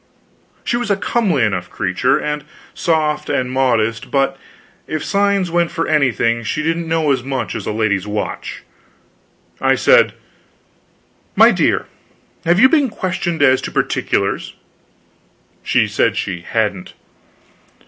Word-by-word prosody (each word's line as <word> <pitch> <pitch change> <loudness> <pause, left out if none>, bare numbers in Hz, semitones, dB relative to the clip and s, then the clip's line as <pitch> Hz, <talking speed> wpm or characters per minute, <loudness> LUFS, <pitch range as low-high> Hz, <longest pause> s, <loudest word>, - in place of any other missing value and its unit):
She 240 - 0
was 240 -2 -3
a 200 - +3
comely 195 - +1
enough 95 -5 -1
creature, 100 +7 0
and 150 -1 -3 0.3
soft 155 -3 0
and 125 -1 -1
modest, 115 -4 0
but, 135 -1 +1 0.5
if 155 - -3
signs 200 -3 +1
went 170 0 +1
for 165 - -2
anything, 125 -6 +1
she 150 +7 -2
didn't 165 +1 -1
know 160 -2 +1
as 130 -2 +1
much 130 -2 -3
as - - -5
a - - -1
lady's 105 -3 0
watch. 105 0 -4 1.0
I - - +3
said: - - +4 1.2
"My - - +7
dear, - - +1 0.6
have 175 +3 +3
you 260 - +8
been 285 -2 +2
questioned 175 -6 -2
as 130 -1 +4
to - - -4
particulars?" - - -1 1.1
She - - +2
said - - 0
she 85 -2 -3
hadn't. 105 -1 -2
140 Hz, 135 wpm, -18 LUFS, 115-170 Hz, 1.2 s, you